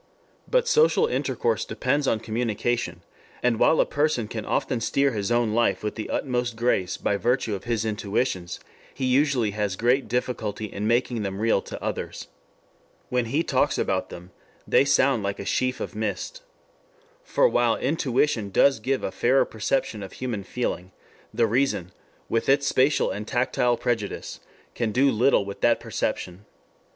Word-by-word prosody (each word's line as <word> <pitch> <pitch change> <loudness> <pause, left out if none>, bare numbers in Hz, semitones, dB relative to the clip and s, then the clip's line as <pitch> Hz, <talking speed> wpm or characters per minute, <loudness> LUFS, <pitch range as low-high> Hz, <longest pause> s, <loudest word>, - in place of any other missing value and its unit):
But - - +2
social 465 -1 +4
intercourse 470 0 -1
depends 140 +2 -1
on 110 - +1
communication, 115 -5 -2 0.4
and 120 -2 +2
while 160 - +4
a - - +5
person 145 -6 0
can 110 -1 -6
often 120 -3 -1
steer 140 +4 +2
his 105 -1 -2
own 120 -2 +2
life 120 -1 +1
with 105 - -2
the 110 - -6
utmost 125 -3 -1
grace 110 -6 0
by 100 - 0
virtue 120 0 0
of 95 - -5
his 115 -2 -1
intuitions, 105 -3 -2 0.4
he 130 - -2
usually 130 -4 +2
has 105 -2 -2
great 125 +6 +2
difficulty 110 -3 -2
in 105 0 -4
making 120 0 +1
them 95 -1 -3
real 110 -3 +2
to - - -8
others. - - -4 0.8
When 125 -1 +1
he 140 +8 0
talks 140 0 +1
about 95 -1 -1
them 90 +2 -10 0.4
they - - +4
sound 135 -3 +3
like 100 0 -2
a 100 - -6
sheaf 130 +4 0
of - - -5
mist. 110 - -4 0.8
For - - +3
while - - +2
intuition 130 -7 0
does 135 +6 +4
give 130 +5 -1
a - - -2
fairer 130 +3 +3
perception 110 0 -2
of 95 - -8
human 120 -6 -4
feeling, 95 -5 -3 0.4
the 115 +1 +2
reason 115 -6 0 0.4
with 115 +2 -1
its 140 +1 +4
spatial 135 +2 +2
and 105 +2 -5
tactile 120 -1 +1
prejudice 115 -4 -3 0.3
can 115 -3 -1
do 135 +5 +3
little 120 -2 +3
with 100 0 -8
that - - +3
perception. 90 +3 -4
120 Hz, 160 wpm, -25 LUFS, 105-130 Hz, 0.8 s, a